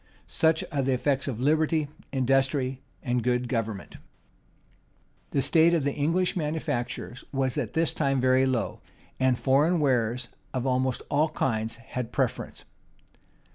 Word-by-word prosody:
Such 160 Hz, 0 st, +2 dB
are 140 Hz, -, 0 dB
the 135 Hz, 0 st, +1 dB
effects 135 Hz, +2 st, 0 dB
of 120 Hz, -5 st, -3 dB
liberty, 155 Hz, +2 st, +2 dB, 0.2 s
industry, 135 Hz, 0 st, +1 dB, 0.2 s
and 125 Hz, -1 st, 0 dB
good 125 Hz, +1 st, 0 dB
government! 110 Hz, -4 st, -3 dB, 1.3 s
The 135 Hz, -, 0 dB
state 170 Hz, +1 st, +4 dB
of 160 Hz, -, +1 dB
the 140 Hz, 0 st, 0 dB
English 165 Hz, +5 st, +1 dB
manufactures 150 Hz, -6 st, -3 dB
was 135 Hz, -2 st, 0 dB
at -, -, -2 dB
this 165 Hz, 0 st, +1 dB
time 135 Hz, -3 st, +1 dB
very 130 Hz, +1 st, +4 dB
low; 125 Hz, -5 st, -1 dB, 0.4 s
and 130 Hz, -1 st, +3 dB
foreign 150 Hz, +8 st, +3 dB
wares 125 Hz, -3 st, +1 dB, 0.3 s
of 130 Hz, 0 st, -1 dB
almost 130 Hz, -1 st, 0 dB
all 150 Hz, +2 st, +3 dB
kinds 115 Hz, -6 st, -1 dB
had 120 Hz, +1 st, -5 dB
the 120 Hz, -, -24 dB
preference. 130 Hz, -4 st, -2 dB
135 Hz, 140 wpm, -27 LUFS, 125-150 Hz, 1.3 s, state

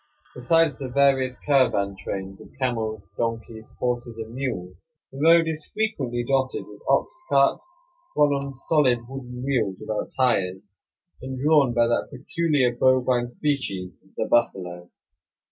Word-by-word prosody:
Besides 165 Hz, +5 st, +2 dB
the 135 Hz, -2 st, -4 dB
various 135 Hz, -1 st, +2 dB
caravan 115 Hz, -9 st, +2 dB
trains 95 Hz, 0 st, -6 dB
of -, -, -13 dB
camels, 110 Hz, -5 st, -2 dB
donkeys, 115 Hz, -1 st, -4 dB
horses, 120 Hz, -2 st, -2 dB
and 115 Hz, 0 st, -7 dB
mules, 95 Hz, -9 st, -4 dB, 0.4 s
the 135 Hz, -, -9 dB
road 165 Hz, +2 st, +6 dB
is 155 Hz, -1 st, -4 dB
frequently 135 Hz, -, -1 dB
dotted 135 Hz, -1 st, 0 dB
with -, -, -14 dB
ox -, -, +2 dB, 0.2 s
carts, -, -, +3 dB, 0.5 s
run 145 Hz, -1 st, +5 dB
on 140 Hz, 0 st, -2 dB
solid 130 Hz, -5 st, +2 dB
wooden 125 Hz, -1 st, -7 dB
wheels 120 Hz, -8 st, 0 dB
without 110 Hz, -1 st, -3 dB
tires, 100 Hz, -6 st, +1 dB, 0.5 s
and 130 Hz, 0 st, -6 dB
drawn 145 Hz, -3 st, +4 dB
by 120 Hz, 0 st, +4 dB
that 120 Hz, 0 st, 0 dB
peculiar 140 Hz, -2 st, 0 dB
bovine 125 Hz, -1 st, +3 dB
species, 120 Hz, -9 st, -2 dB, 0.3 s
the -, -, 0 dB
buffalo. 90 Hz, -6 st, 0 dB
125 Hz, 135 wpm, -24 LUFS, 115-140 Hz, 0.5 s, road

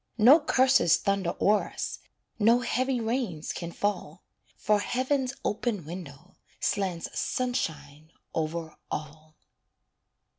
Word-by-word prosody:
No 250 Hz, +8 st, +8 dB
curses 260 Hz, -, +4 dB
thunder 195 Hz, -1 st, -1 dB
o'er 210 Hz, +1 st, +3 dB
us, -, -, -4 dB, 0.4 s
No 230 Hz, +3 st, +5 dB
heavy 255 Hz, +1 st, 0 dB
rains 225 Hz, -, -2 dB
can 170 Hz, -1 st, -5 dB
fall; 180 Hz, -4 st, -3 dB, 0.3 s
For 210 Hz, 0 st, +2 dB
heaven's 255 Hz, +4 st, 0 dB
open 210 Hz, -5 st, -1 dB
window 170 Hz, 0 st, -9 dB, 0.2 s
Slants 185 Hz, -4 st, -1 dB
sunshine 155 Hz, -, -3 dB, 0.2 s
over 160 Hz, 0 st, -3 dB
all. 155 Hz, +1 st, -7 dB
195 Hz, 105 wpm, -28 LUFS, 160-245 Hz, 0.4 s, No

